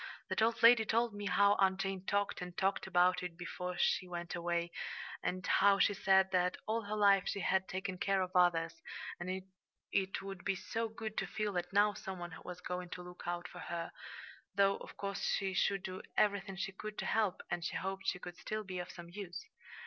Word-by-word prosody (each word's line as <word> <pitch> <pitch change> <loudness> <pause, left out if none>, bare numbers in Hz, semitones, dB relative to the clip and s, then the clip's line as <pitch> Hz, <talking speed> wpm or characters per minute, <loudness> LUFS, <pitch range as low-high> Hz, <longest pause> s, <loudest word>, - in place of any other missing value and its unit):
"That - - 0
old 225 +1 +2
lady 230 -1 +9
told 230 +1 +1
me 205 0 -4
how 200 +2 +5
Aunt 190 -1 +4
Jane 195 -1 -2
talked 200 0 0
and 180 -1 -7
talked 195 0 +1
about 180 0 +4
it 180 -2 -5
before 180 +1 -4
she 185 - +2
went 175 -1 -5
away, 170 0 -1 0.5
and 185 0 -2
how 200 0 +5
she 200 - +4
said 190 -1 +4
that 180 -1 +2
all 225 +1 0
her 210 +1 -2
life 200 -2 +5
she 200 - -1
had 190 +2 +2
taken 185 0 -3
care 195 -1 +2
of 185 0 -6
others, 165 -2 +3 0.4
and 185 +2 -3 0.5
it 195 0 +1
would 195 -2 -7
be 195 +1 +1
so 225 +4 -2
good 220 0 -6
to - - 0
feel 210 -1 -2
that 175 -1 -2
now 205 +1 +4
some 190 -1 -6
one 175 -1 -6
was 180 0 -7
going 180 0 -4
to 180 - -6
look 180 0 -10
out 175 0 -2
for - - -10
her, 170 -1 -4 0.6
though, 200 0 +4
of - - -11
course, 200 0 -3
she 195 -1 -1
should 195 +1 +1
do 185 0 -5 0.2
everything 200 -2 +2
she 190 0 -3
could 210 +2 -7
to - - -2
help, 215 -4 +1
and 175 -1 -1
she - - -2
hoped 190 +2 -3
she 180 - +1
could 175 -1 -8
still 215 0 -3
be 185 -2 -5
of 180 - -5
some 170 -1 -10
use." 185 -2 -6
190 Hz, 215 wpm, -35 LUFS, 180-200 Hz, 0.6 s, lady